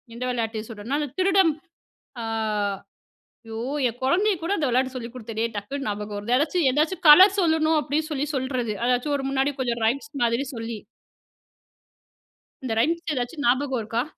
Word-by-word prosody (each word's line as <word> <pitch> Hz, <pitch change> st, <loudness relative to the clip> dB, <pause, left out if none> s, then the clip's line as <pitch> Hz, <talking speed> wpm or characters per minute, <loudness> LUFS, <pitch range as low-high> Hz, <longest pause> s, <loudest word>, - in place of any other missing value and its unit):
இந்த 250 Hz, -, -5 dB
விளையாட்டு 225 Hz, -3 st, -2 dB
சொல்றன்னா, 225 Hz, +6 st, -3 dB
அந்த 295 Hz, -, -2 dB
திருடன் 375 Hz, -2 st, +4 dB, 0.7 s
அ -, -, -4 dB, 1.2 s
ஐயோ! 225 Hz, 0 st, -6 dB, 0.3 s
என் 240 Hz, +1 st, -6 dB
கொழந்தைய 385 Hz, +10 st, +2 dB
கூட 335 Hz, +3 st, -3 dB
அந்த 295 Hz, -, 0 dB
விளையாட்டு 260 Hz, +1 st, 0 dB
சொல்லிக் 235 Hz, -1 st, -6 dB
குடுத்தனே! 225 Hz, -2 st, -3 dB
டக்குனு 265 Hz, +8 st, -4 dB
ஞாபகம் 210 Hz, 0 st, -4 dB
வருது 220 Hz, +5 st, 0 dB
ஏதாச்சும், 300 Hz, +2 st, +1 dB
ஏதாச்சும் 315 Hz, +6 st, 0 dB
கலர் 375 Hz, +6 st, +9 dB
சொல்லணும் 320 Hz, -2 st, +2 dB
அப்பிடின்னு 305 Hz, +2 st, -2 dB
சொல்லி 290 Hz, 0 st, -1 dB
சொல்லுறது. 255 Hz, -4 st, -2 dB
ஏதாச்சும் 250 Hz, +4 st, +1 dB
ஒரு 270 Hz, -, -5 dB
முன்னாடி 270 Hz, +1 st, 0 dB
கொஞ்சம் 235 Hz, -2 st, -2 dB
ரைம்ஸ் 275 Hz, +6 st, -1 dB
மாதிரி 235 Hz, +4 st, +1 dB
சொல்லி. 225 Hz, -1 st, -5 dB, 1.8 s
இந்த 245 Hz, -3 st, -2 dB
ரைம்ஸ் 335 Hz, +7 st, +1 dB
எதாச்சும் 265 Hz, +3 st, -3 dB
ஞாபகம் 260 Hz, +1 st, +1 dB
இருக்கா? 225 Hz, +2 st, -2 dB
260 Hz, 150 wpm, -24 LUFS, 235-300 Hz, 1.8 s, கலர்